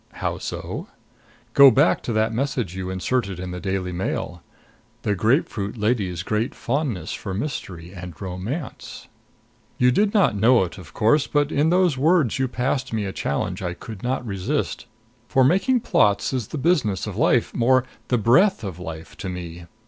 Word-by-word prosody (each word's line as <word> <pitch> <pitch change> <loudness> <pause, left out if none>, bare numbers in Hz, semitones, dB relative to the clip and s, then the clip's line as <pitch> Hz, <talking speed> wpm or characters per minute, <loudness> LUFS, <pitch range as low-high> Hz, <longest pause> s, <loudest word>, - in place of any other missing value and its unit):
How - - -3
so? - - -5 0.7
Go 140 -1 +9
back 120 - +3
to 120 - -3
that 110 +1 +1
message 125 -7 -2
you 95 -1 -4
inserted 95 +1 -1
in 90 0 -5
the 90 - -5
Daily 95 -1 -2
Mail: 90 -1 -3 0.6
"The 105 - +1
grapefruit 110 - 0
lady's 105 -6 0
great 110 +4 -1
fondness 120 - -2
for 95 -2 -5
mystery 90 - -5
and 90 -4 -9
romance 100 - -6 0.4
" 120 -1 -37
You 125 0 +4
did 205 +10 +2
not 200 - +3
know 115 +2 +5
it, 90 +2 -6
of 85 -5 -13
course; 135 +7 +3
but 145 0 +1
in 150 +3 +2
those 175 -6 +3
words 155 - +3
you 130 - +2
passed 130 +2 -2
me 110 -2 -1
a 95 - -4
challenge 70 - -2
I 90 -1 -3
could 110 +1 -9
not 125 0 -2
resist; 95 -4 -2 0.4
for 130 - +3
making 195 - +3
plots 100 - +2
is 125 -5 -2
the - - -5
business 135 - +1
of - - -5
life - - +2
more, 130 +2 +3 0.2
the 125 - +2
breath 125 - +4
of 95 -4 -5
life 80 -2 -8
to 95 - -5
me. 85 -1 -7
110 Hz, 175 wpm, -23 LUFS, 95-135 Hz, 0.7 s, Go